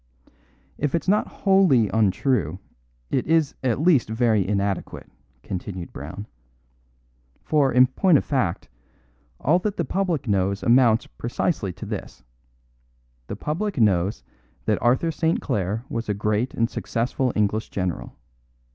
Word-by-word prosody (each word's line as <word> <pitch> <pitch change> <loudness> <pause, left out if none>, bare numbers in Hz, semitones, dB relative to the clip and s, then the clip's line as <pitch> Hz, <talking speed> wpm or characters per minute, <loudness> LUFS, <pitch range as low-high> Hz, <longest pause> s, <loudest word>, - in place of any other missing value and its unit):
"If 150 +5 -1
not 205 +3 +2
wholly 190 - +3
untrue, 100 - +1 0.5
it 130 - 0
is 160 -2 +2
at 125 -1 +1
least 155 -8 +3
very 110 -4 +2
inadequate," 100 -1 -2 0.4
continued 90 -2 -6
Brown; 80 +9 -7 1.2
"for 145 -4 +2
in 125 +2 +6
point 155 +6 +3
of - - -2
fact, 125 - -1 0.7
all 170 +6 +3
that 210 +2 -3
the 170 - 0
public 175 -4 -1
knows 100 -1 0
amounts 120 -2 +4
precisely 120 - -2
to 95 - -9
this: - - -7 1.0
The 100 - -5
public 170 - -3
knows 100 -2 +2 0.4
that - - 0
Arthur 130 +7 +2
St. 165 +1 0
Clare 105 - -2
was 115 -7 -4
a 105 - 0
great 105 +4 -1
and 115 - +2
successful 125 +2 -2
English 105 +1 0
general. 90 -3 -4
120 Hz, 130 wpm, -23 LUFS, 100-150 Hz, 1.2 s, in